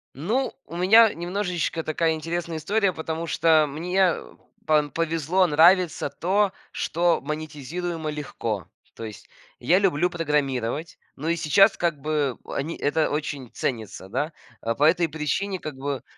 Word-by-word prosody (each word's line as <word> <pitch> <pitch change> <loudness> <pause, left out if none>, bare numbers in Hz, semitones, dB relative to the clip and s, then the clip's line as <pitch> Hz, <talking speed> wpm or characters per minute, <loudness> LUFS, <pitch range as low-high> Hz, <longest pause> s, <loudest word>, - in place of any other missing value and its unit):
Ну, 220 - -1
у - - -9
меня 220 +5 +6
немножечко 175 -2 -2
такая 160 +1 +1
интересная 165 +1 -3
история, 200 +4 +1
потому 160 +1 -4
что 160 -1 +4
мне 180 +5 +1 0.5
пан 150 -2 +3
повезло, 165 +3 +1
нравится 170 +3 +4
то, 190 +5 +1 0.2
что 170 +1 +1
монетизируемо 155 +2 -4
легко. 115 - -4 0.3
То 115 - -7
есть 105 -2 -10 0.3
я 180 +3 +3
люблю 180 -3 +2
программировать, 150 -3 -1 0.2
но 155 +4 -4
и 170 - +2
сейчас 195 +6 +4
как 165 -4 0
бы 150 -3 -1
они, 155 +4 -4
это 155 +2 +1
очень 145 -4 -3
ценится, 110 -6 -4
да. 145 - -2 0.3
Э, 115 0 -1
по 145 - 0
этой 165 +1 +4
причине 160 +6 -2
как 150 -4 -7
бы, 140 0 -3
160 Hz, 140 wpm, -25 LUFS, 145-175 Hz, 0.5 s, меня